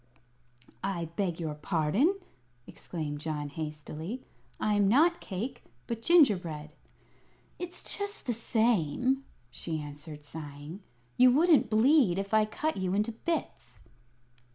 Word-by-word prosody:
"I 175 Hz, -4 st, -2 dB
beg 180 Hz, -4 st, -1 dB
your 160 Hz, -3 st, -2 dB
pardon," 175 Hz, -, +1 dB, 0.5 s
exclaimed 150 Hz, -4 st, -5 dB
John, 150 Hz, -1 st, -3 dB
hastily. 155 Hz, -, -6 dB, 0.4 s
"I 215 Hz, -, +1 dB
am 205 Hz, -1 st, +3 dB
not 320 Hz, -, +4 dB
cake, 235 Hz, +6 st, -5 dB, 0.2 s
but 230 Hz, -1 st, -4 dB
gingerbread." 180 Hz, -, +3 dB, 0.9 s
"It's 355 Hz, 0 st, -3 dB
just 405 Hz, +1 st, -4 dB
the 245 Hz, -, 0 dB
same," 235 Hz, -, +1 dB, 0.3 s
she 160 Hz, +4 st, -3 dB
answered, 150 Hz, +1 st, -9 dB
sighing; 150 Hz, +4 st, -8 dB, 0.4 s
"you 255 Hz, 0 st, +8 dB
wouldn't 310 Hz, -2 st, +5 dB
bleed 225 Hz, -, +4 dB
if 195 Hz, +2 st, -3 dB
I 215 Hz, 0 st, +5 dB
cut 315 Hz, +8 st, -2 dB
you 185 Hz, 0 st, 0 dB
into 210 Hz, +3 st, +1 dB
bits." 220 Hz, -, -4 dB
195 Hz, 120 wpm, -30 LUFS, 155-250 Hz, 0.9 s, you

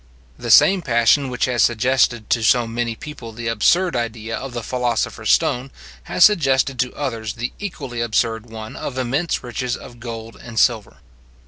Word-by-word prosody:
The 120 Hz, -, -7 dB
same 190 Hz, -, +6 dB
passion 125 Hz, +1 st, +3 dB
which 125 Hz, -, 0 dB
has 125 Hz, -2 st, 0 dB
suggested 120 Hz, -1 st, +2 dB
to 115 Hz, -, +2 dB
so 120 Hz, +2 st, +3 dB
many 115 Hz, 0 st, -3 dB
people 140 Hz, -4 st, -9 dB
the 120 Hz, +1 st, -6 dB
absurd 170 Hz, -, +2 dB
idea 115 Hz, -1 st, -3 dB
of 135 Hz, -, -6 dB
the 120 Hz, -1 st, -4 dB
philosopher's 125 Hz, -1 st, -2 dB
stone, 125 Hz, +2 st, +2 dB, 0.4 s
has 180 Hz, -, +5 dB
suggested 135 Hz, -9 st, +2 dB
to 125 Hz, -, 0 dB
others 115 Hz, -7 st, -3 dB
the 120 Hz, +2 st, -4 dB
equally 135 Hz, -12 st, -5 dB
absurd 115 Hz, 0 st, 0 dB
one 110 Hz, -1 st, -9 dB
of 130 Hz, -, -5 dB
immense 135 Hz, +7 st, -1 dB
rich 120 Hz, 0 st, -5 dB
mines 125 Hz, -1 st, -2 dB
of 120 Hz, -2 st, -13 dB
gold 115 Hz, -1 st, -7 dB
and 115 Hz, -2 st, -10 dB
silver. 115 Hz, -4 st, +1 dB
120 Hz, 175 wpm, -20 LUFS, 115-130 Hz, 0.4 s, same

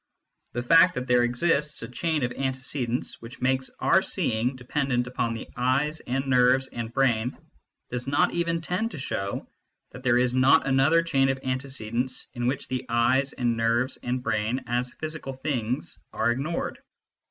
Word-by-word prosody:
The 120 Hz, -, -2 dB
fact 165 Hz, +7 st, +6 dB
that 125 Hz, -, -3 dB
there 125 Hz, -1 st, +4 dB
exists 140 Hz, +4 st, +1 dB
a -, -, -5 dB
chain 155 Hz, +4 st, -1 dB
of 120 Hz, -, 0 dB
antecedents 130 Hz, -2 st, -3 dB
which 115 Hz, +1 st, -10 dB
makes 130 Hz, +1 st, 0 dB
our -, -, +4 dB
seeing 115 Hz, +4 st, 0 dB
dependent 130 Hz, -1 st, -1 dB
upon 120 Hz, -2 st, -2 dB
the 115 Hz, -, -7 dB
eyes 135 Hz, +5 st, +1 dB
and 135 Hz, +2 st, -2 dB
nerves 130 Hz, 0 st, +4 dB
and 115 Hz, -1 st, -5 dB
brain 125 Hz, -2 st, +1 dB, 0.5 s
does 125 Hz, +1 st, -4 dB
not 145 Hz, +1 st, +2 dB
even 170 Hz, -1 st, 0 dB
tend 180 Hz, +8 st, -1 dB
to 170 Hz, -, -8 dB
show 100 Hz, -7 st, -3 dB, 0.4 s
that 125 Hz, -, -10 dB
there 125 Hz, -2 st, +3 dB
is 125 Hz, 0 st, +2 dB
not 135 Hz, +4 st, +5 dB
another 135 Hz, +5 st, +4 dB
chain 135 Hz, -5 st, +2 dB
of 135 Hz, -, 0 dB
antecedents 130 Hz, -1 st, -2 dB
in 120 Hz, -1 st, -2 dB
which 130 Hz, +1 st, -1 dB
the 130 Hz, 0 st, -3 dB
eyes 130 Hz, +4 st, +2 dB
and 120 Hz, -3 st, 0 dB
nerves 115 Hz, +3 st, +1 dB
and 125 Hz, +1 st, -2 dB
brain 110 Hz, +4 st, -1 dB
as 120 Hz, +1 st, -1 dB
physical 155 Hz, -3 st, -5 dB
things 130 Hz, -3 st, -3 dB
are 120 Hz, -, +1 dB
ignored. 140 Hz, +7 st, -3 dB
130 Hz, 165 wpm, -26 LUFS, 120-140 Hz, 0.5 s, fact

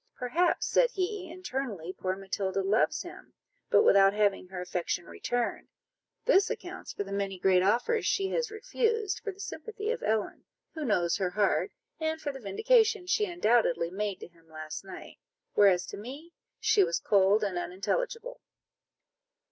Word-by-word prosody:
"Perhaps," 335 Hz, +8 st, +1 dB
said -, -, +3 dB
he, 385 Hz, -3 st, -3 dB
"internally, 260 Hz, -, -5 dB
poor 185 Hz, 0 st, -2 dB
Matilda 195 Hz, 0 st, -2 dB
loves 210 Hz, +4 st, +2 dB
him, -, -, -12 dB, 0.3 s
but -, -, +5 dB
without 195 Hz, -, +6 dB
having 205 Hz, -3 st, +1 dB
her 185 Hz, 0 st, -7 dB
affection 180 Hz, -1 st, -2 dB
returned: 245 Hz, +5 st, -3 dB, 0.6 s
this 405 Hz, -5 st, +4 dB
accounts 375 Hz, -5 st, -6 dB
for -, -, -4 dB
the 195 Hz, -, -10 dB
many 200 Hz, -1 st, -2 dB
great 185 Hz, 0 st, +4 dB
offers 245 Hz, -, +2 dB
she 390 Hz, -1 st, +1 dB
has 480 Hz, +1 st, -1 dB
refused, 445 Hz, -1 st, -1 dB
for 410 Hz, -, -4 dB
the 385 Hz, -, -19 dB
sympathy 435 Hz, +1 st, -5 dB
of 485 Hz, -, -3 dB
Ellen, 220 Hz, -1 st, -1 dB, 0.3 s
who 315 Hz, -, -5 dB
knows 180 Hz, -5 st, +1 dB
her 190 Hz, -3 st, 0 dB
heart, 205 Hz, -, +1 dB, 0.3 s
and 320 Hz, 0 st, -1 dB
for 290 Hz, -, -3 dB
the 270 Hz, -, -9 dB
vindication 435 Hz, -, +2 dB
she 400 Hz, +3 st, +2 dB
undoubtedly 230 Hz, -, +2 dB
made 200 Hz, 0 st, -3 dB
to -, -, -7 dB
him 165 Hz, -1 st, -26 dB
last 155 Hz, +1 st, -7 dB
night; 190 Hz, -, -11 dB, 0.3 s
whereas 190 Hz, -3 st, +5 dB
to -, -, -8 dB
me 280 Hz, +11 st, -9 dB, 0.3 s
she 405 Hz, -, +4 dB
was -, -, 0 dB
cold 200 Hz, -, +3 dB
and 190 Hz, -4 st, -1 dB
unintelligible." 465 Hz, -, -3 dB
230 Hz, 160 wpm, -29 LUFS, -, 0.6 s, without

